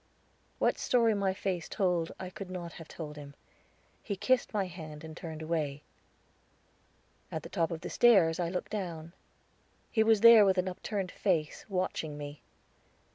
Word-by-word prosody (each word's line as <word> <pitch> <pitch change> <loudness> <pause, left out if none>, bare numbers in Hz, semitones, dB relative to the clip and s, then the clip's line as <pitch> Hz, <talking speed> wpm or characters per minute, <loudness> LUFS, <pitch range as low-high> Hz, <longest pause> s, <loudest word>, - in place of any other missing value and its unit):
What - - +1
story 230 -3 +3
my 200 -2 +1
face 190 -2 -3
told, 180 -5 0
I 185 -1 -6
could 195 0 -8
not 175 -2 -6
have 165 - -10
told 150 -2 -8
him. 140 -1 -10 0.7
He 205 - -3
kissed 255 +6 +1
my 205 -3 0
hand 160 -4 -9
and 160 -1 -8
turned 160 -2 -7
away. 155 -3 -2 1.5
At - - -4
the - - -8
top 165 -1 0
of 165 -2 -5
the - - -5
stairs 185 -9 +5
I 170 -1 0
looked 180 0 -4
down. 170 -5 -5 0.8
He 220 - +2
was 220 -2 +4
there 230 -2 +10
with 190 -1 +3
upturned 185 +1 -2
face, 165 -7 -1
watching 180 -5 -2
me. 145 0 -8
180 Hz, 160 wpm, -31 LUFS, 160-200 Hz, 1.5 s, there